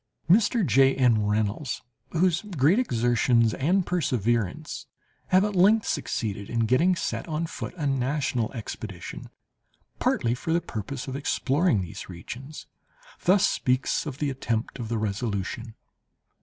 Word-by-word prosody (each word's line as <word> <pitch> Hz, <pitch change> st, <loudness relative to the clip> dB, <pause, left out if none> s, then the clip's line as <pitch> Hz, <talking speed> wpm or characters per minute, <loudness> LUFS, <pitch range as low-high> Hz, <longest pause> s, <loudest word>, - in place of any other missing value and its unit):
Mr. 210 Hz, +4 st, +4 dB
J. 135 Hz, -3 st, +4 dB
N. 115 Hz, -6 st, +3 dB
Reynolds, 105 Hz, +6 st, -1 dB, 0.3 s
whose 175 Hz, 0 st, +2 dB
great 180 Hz, -, +2 dB
exertions 120 Hz, -, +2 dB
and 180 Hz, +6 st, +1 dB
perseverance 120 Hz, -, -1 dB, 0.4 s
have 185 Hz, +2 st, +4 dB
at 210 Hz, -1 st, -2 dB
length 205 Hz, +4 st, +5 dB
succeeded 100 Hz, -3 st, -2 dB
in 115 Hz, -1 st, 0 dB
getting 130 Hz, +11 st, +3 dB
set 170 Hz, -, -3 dB
on 160 Hz, 0 st, -1 dB
foot 165 Hz, -, -6 dB
a 150 Hz, -, -2 dB
national 135 Hz, -3 st, 0 dB
expedition, 105 Hz, -5 st, -7 dB, 0.7 s
partly 120 Hz, 0 st, +1 dB
for 160 Hz, +6 st, -2 dB
the 170 Hz, -, +3 dB
purpose 130 Hz, -, -6 dB
of 130 Hz, -, -4 dB
exploring 140 Hz, -, +1 dB
these 90 Hz, +1 st, -7 dB
regions, 125 Hz, -, -8 dB, 0.6 s
thus 190 Hz, +2 st, +5 dB
speaks 130 Hz, +4 st, 0 dB
of 140 Hz, -3 st, -5 dB
the 145 Hz, -1 st, -1 dB
attempt 120 Hz, -1 st, -3 dB
of 115 Hz, -2 st, -5 dB
the 115 Hz, -, -1 dB
Resolution. 110 Hz, +1 st, -3 dB
130 Hz, 135 wpm, -26 LUFS, 115-165 Hz, 0.7 s, length